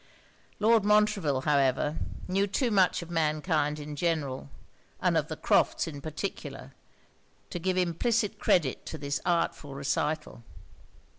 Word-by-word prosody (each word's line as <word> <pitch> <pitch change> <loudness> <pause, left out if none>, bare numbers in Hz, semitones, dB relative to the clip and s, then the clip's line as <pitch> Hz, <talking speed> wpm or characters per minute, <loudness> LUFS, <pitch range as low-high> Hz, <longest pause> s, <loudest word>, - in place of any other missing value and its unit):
Lord 225 0 +4
Montreville, 210 -9 +3
however, 140 +1 +2 0.3
knew 195 +2 +1
too 230 +5 0
much 190 -3 +3
of 170 - -11
mankind 155 -1 +1
in 150 0 -7
general, 145 - -1 0.5
and - - +2
of - - +1
the - - -4
Crofts' - - +2
in 145 -3 -7
particular, 145 -4 -6 0.8
to 175 - -3
give 185 +2 0
implicit 210 +5 0
credit 150 -8 +2
to 160 - -5
this 140 -1 -3
artful 165 -5 0
recital. 145 -1 -2
160 Hz, 130 wpm, -29 LUFS, 145-190 Hz, 0.8 s, Lord